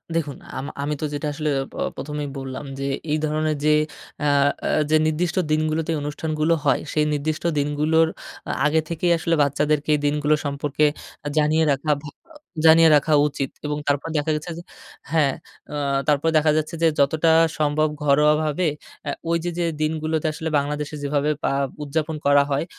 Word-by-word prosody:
দেখুন। 150 Hz, -4 st, -2 dB, 0.2 s
আম 130 Hz, -, -4 dB, 0.2 s
আমি 145 Hz, +1 st, -1 dB
তো -, -, 0 dB
যেটা 145 Hz, +1 st, -3 dB
আসলে 150 Hz, +1 st, -2 dB, 0.2 s
প -, -, -12 dB, 0.2 s
১ম 150 Hz, +1 st, -6 dB
এই 145 Hz, -, -4 dB
বললাম 135 Hz, +1 st, -6 dB
যে, 135 Hz, -, -2 dB, 0.3 s
এই 155 Hz, -, +2 dB
ধরনের 155 Hz, 0 st, 0 dB
যে, 155 Hz, -, +5 dB, 0.5 s
আ -, -, +3 dB, 0.4 s
আ -, -, 0 dB, 0.2 s
যে, 155 Hz, -, +4 dB
নির্দিষ্ট 165 Hz, +3 st, -1 dB
দিনগুলোতে 155 Hz, +1 st, 0 dB
এই -, -, -1 dB
অনুষ্ঠানগুলো 155 Hz, +2 st, -1 dB
হয়, 135 Hz, -3 st, +3 dB
সেই 150 Hz, -1 st, +2 dB
নির্দিষ্ট 155 Hz, +2 st, -2 dB
দিনগুলোর 150 Hz, +3 st, +2 dB, 0.4 s
আ -, -, 0 dB
আগে 155 Hz, +2 st, +3 dB
থেকেই 170 Hz, +1 st, 0 dB
আসলে 165 Hz, 0 st, 0 dB
বাচ্চাদেরকে 145 Hz, +1 st, 0 dB
এই -, -, -1 dB
দিনগুলো 150 Hz, +1 st, +2 dB
সম্পর্কে 145 Hz, +1 st, 0 dB, 0.4 s
আ -, -, -2 dB
জানিয়ে 155 Hz, +1 st, +3 dB
রাখা 140 Hz, +3 st, 0 dB
ভা 150 Hz, -, -7 dB, 0.6 s
জানিয়ে 160 Hz, 0 st, +8 dB
রাখা 150 Hz, +2 st, +2 dB
উচিত। 140 Hz, -2 st, -3 dB, 0.2 s
এবং 150 Hz, 0 st, -2 dB
তারপর 145 Hz, +1 st, 0 dB
দেখা 150 Hz, +2 st, 0 dB
গেছে 155 Hz, +3 st, -5 dB
যে 170 Hz, -, -8 dB, 0.5 s
হ্যাঁ। 150 Hz, -4 st, +3 dB, 0.4 s
আ -, -, -3 dB, 0.3 s
তারপরে 150 Hz, +2 st, +2 dB
দেখা 155 Hz, 0 st, +3 dB
যাচ্ছে 155 Hz, +1 st, -2 dB
যে, -, -, +6 dB
যতটা 155 Hz, +4 st, +3 dB, 0.3 s
সম্ভব 155 Hz, +1 st, +2 dB, 0.2 s
ঘরোয়াভাবে 150 Hz, +3 st, +3 dB, 0.4 s
এ্যা 145 Hz, -, -2 dB, 0.2 s
ওইযে 170 Hz, +1 st, 0 dB
যে, 175 Hz, -, +1 dB, 0.2 s
দিনগুলোতে 155 Hz, 0 st, -1 dB
আসলে 160 Hz, +1 st, -4 dB
বাংলাদেশে 150 Hz, +1 st, -2 dB
যেভাবে 145 Hz, +1 st, 0 dB
পা -, -, +1 dB, 0.3 s
উদযাপন 155 Hz, +2 st, -2 dB
করা 145 Hz, 0 st, +5 dB
হয়। 140 Hz, +3 st, 0 dB
150 Hz, 170 wpm, -23 LUFS, 145-160 Hz, 0.6 s, জানিয়ে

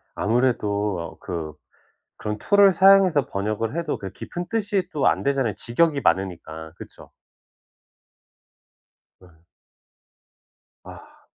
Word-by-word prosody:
아무래도 105 Hz, -4 st, 0 dB
어 85 Hz, -, -8 dB
그 80 Hz, -4 st, -6 dB, 0.6 s
그런 105 Hz, 0 st, -4 dB
툴을 200 Hz, -, +5 dB
사용해서 190 Hz, -5 st, +5 dB
번역을 110 Hz, +6 st, -3 dB
해도 170 Hz, -1 st, -2 dB
그 95 Hz, -2 st, -7 dB
깊은 175 Hz, -, -7 dB
뜻이 205 Hz, -4 st, -1 dB
또 145 Hz, -, 0 dB
안 -, -, +2 dB
되잖아요, 135 Hz, -7 st, 0 dB
직역이 145 Hz, +7 st, 0 dB
많으니까. 80 Hz, -4 st, -2 dB
그쵸? -, -, -13 dB, 2.1 s
네. 90 Hz, -1 st, -18 dB, 1.5 s
아. -, -, -14 dB
115 Hz, 215 characters per minute, -23 LUFS, -, 2.1 s, 툴을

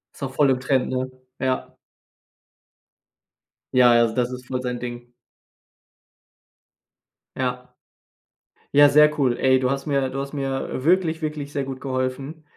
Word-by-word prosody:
Ist -, -, -10 dB
auch 130 Hz, -, -4 dB
voll 140 Hz, 0 st, +3 dB
im 125 Hz, -, 0 dB
Trend, 130 Hz, -1 st, +1 dB
ne? 130 Hz, 0 st, -2 dB, 0.3 s
Ja. 130 Hz, -1 st, -2 dB, 2.0 s
Ja, 125 Hz, -1 st, +6 dB
ja, 120 Hz, -, +5 dB
also 115 Hz, -1 st, +1 dB
das 125 Hz, 0 st, 0 dB
ist 125 Hz, 0 st, -8 dB
voll 130 Hz, -1 st, -3 dB
sein 125 Hz, -1 st, -3 dB
Ding. 120 Hz, 0 st, -7 dB, 2.3 s
Ja. 125 Hz, -1 st, -3 dB, 1.1 s
Ja, 145 Hz, 0 st, +8 dB
sehr 150 Hz, +1 st, +5 dB
cool, 130 Hz, -4 st, +1 dB
ey. 130 Hz, 0 st, +4 dB
Du 130 Hz, 0 st, +1 dB
hast 135 Hz, +2 st, -3 dB
mir 140 Hz, -3 st, 0 dB
du 135 Hz, -, -5 dB
hast 140 Hz, +1 st, -5 dB
mir, 135 Hz, -2 st, -2 dB
äh, 130 Hz, -, -5 dB
wirklich, 170 Hz, -1 st, +2 dB
wirklich 150 Hz, -2 st, -4 dB
sehr 140 Hz, -2 st, -1 dB
gut 135 Hz, -1 st, -6 dB
geholfen. 135 Hz, +4 st, -4 dB
130 Hz, 155 wpm, -23 LUFS, 125-140 Hz, 2.3 s, Ja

